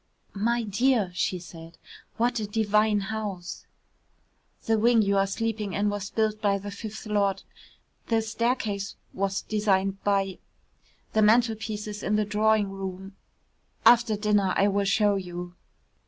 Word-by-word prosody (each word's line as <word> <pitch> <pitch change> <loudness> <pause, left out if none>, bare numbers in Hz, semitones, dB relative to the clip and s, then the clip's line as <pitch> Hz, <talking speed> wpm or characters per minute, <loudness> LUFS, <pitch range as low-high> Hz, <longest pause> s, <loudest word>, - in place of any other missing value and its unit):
"My 235 +4 0
dear," 220 -1 +1
she 185 +1 -1
said, 165 -1 -12 0.4
"what 240 +1 +1
a 210 - -3
divine 210 0 +2
house." 200 -5 -5 1.0
"The 225 -1 +2
wing 230 0 +4
you 200 0 +1
are 195 0 +3
sleeping 215 -1 -3
in 205 +1 +1
was 205 -1 -4
built 215 -1 -1
by 200 -1 +2
the 205 +1 -7
fifth 215 +2 -8
Lord.... 200 -2 0 0.6
"The 225 -1 +1
staircase 220 -3 -2 0.2
was 195 0 -1
designed 195 -2 0
by.... 195 -2 0 0.7
"The 220 - +3
mantelpieces 215 -2 +1
in 210 - 0
the 210 0 +1
drawing 210 -1 +2
room.... 195 0 -7 0.7
"After 230 -2 +5
dinner 205 -2 +1
I 200 - +4
will 200 0 0
show 205 0 +3
you...." 175 -1 -6
210 Hz, 140 wpm, -26 LUFS, 195-220 Hz, 1.0 s, After